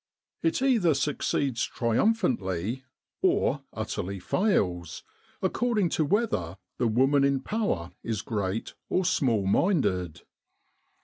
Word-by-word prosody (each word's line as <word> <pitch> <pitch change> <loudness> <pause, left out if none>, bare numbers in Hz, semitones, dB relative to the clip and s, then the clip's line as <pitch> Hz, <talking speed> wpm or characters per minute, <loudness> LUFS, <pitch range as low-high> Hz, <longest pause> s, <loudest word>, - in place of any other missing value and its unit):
It 165 +10 +1
either 220 - +3
succeeds 135 -2 0
triumphantly, 120 - 0 0.4
or - - +2
utterly 95 +2 -4
fails, 90 - 0 0.4
according 210 -1 +1
to 155 - +1
whether 140 - 0 0.2
the 120 - +2
woman 135 +5 +3
in 140 -1 +2
power 135 - -2
is 110 -3 -3
great 105 0 -3 0.2
or 185 - +1
small 120 - +2
minded. 95 - +1
130 Hz, 105 wpm, -27 LUFS, -, 0.4 s, either